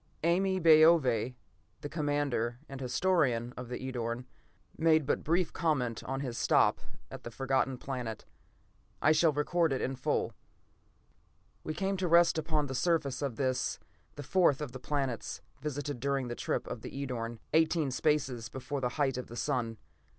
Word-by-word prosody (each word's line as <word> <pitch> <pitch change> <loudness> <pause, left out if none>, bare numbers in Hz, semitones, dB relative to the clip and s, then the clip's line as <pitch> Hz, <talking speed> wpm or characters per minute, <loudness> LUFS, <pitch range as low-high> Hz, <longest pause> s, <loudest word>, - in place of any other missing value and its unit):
Ame 190 +3 +2
Baove, 155 -7 +5 0.5
the - - -4
commander 145 -6 -1
and 135 -1 -8
historian 125 -4 +1
of 125 -1 -7
the 125 - -3
Edorn, 125 -2 -4 0.5
made 160 -2 +3
but - - 0
brief 170 +2 +1
comment 130 -9 0
on 135 +1 -3
his 125 -4 -4
stop - - +3 0.3
at - - -8
the - - -7
Forgotten 135 +1 0
Planet. 125 -5 -5 0.7
I 155 - +4
shall 155 +1 +4
record 160 +3 +1
it 135 - 0
in 135 - -2
full: 125 - -1 1.3
"We 155 - -4
came 195 0 -1
to 185 -1 -1
rest 170 -1 +5
upon 155 -1 0
the 135 - -5
surface 150 -2 0
of 140 -5 -2
this, 130 0 0 0.4
the 145 - -7
fourth 170 -3 +3
of 150 -4 -4
the 130 - -8
planets 135 -3 -3 0.2
visited 145 -2 -3
during 135 -1 -1
the - - -2
first - - -7
trip - - 0
of 120 - -6
the - - -7
Edorn, 120 -4 -4 0.2
eighteen 160 -2 +3
spaces 130 -5 0
before 130 +2 -4
the 125 - +1
height 135 -3 +1
of 125 - -6
the 120 - -9
sun. 120 -6 -1
140 Hz, 165 wpm, -31 LUFS, 125-155 Hz, 1.3 s, Baove